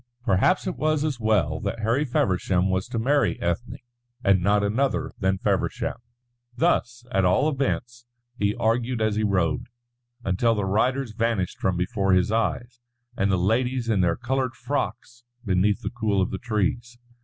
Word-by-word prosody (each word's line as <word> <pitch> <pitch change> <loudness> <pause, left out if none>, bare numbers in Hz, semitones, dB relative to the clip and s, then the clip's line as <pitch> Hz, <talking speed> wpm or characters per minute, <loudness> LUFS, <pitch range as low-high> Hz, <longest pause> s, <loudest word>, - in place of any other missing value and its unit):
Perhaps 105 - +2
it 185 - -3
was 155 -1 +1
as 140 -6 -2
well 95 -9 +1
that 105 +3 -4
Harry 115 +7 +1
Feversham 95 -6 +1
was 95 0 -1
to - - -4
marry 140 +5 +1
Ethne 85 +8 -2 0.5
and 95 -2 +4
not 100 +2 +2
another 135 +5 0
than 95 -2 +1
Feversham. - - -1 0.6
Thus, 120 -5 0
at 95 - +2
all 95 +11 +3
events, 125 -4 -2 0.3
he 105 -2 0
argued 120 +1 0
as 110 -1 +1
he 110 - 0
rode, 95 -2 0 0.6
until 115 +4 +1
the 105 -2 -1
riders 125 +6 0
vanished 110 -4 -1
from 95 -2 0
before 95 +2 0
his 90 +2 +3
eyes, 115 +3 -1 0.4
and 100 -1 +1
the 95 - +2
ladies 120 +6 0
in 105 -4 +2
their 85 -2 +2
coloured 130 +1 -2
frocks 120 -3 -4 0.2
beneath 100 +1 +1
the - - -3
cool 110 -4 0
of 95 - 0
the - - -4
trees. 120 +1 -2
110 Hz, 165 wpm, -25 LUFS, 95-125 Hz, 0.6 s, and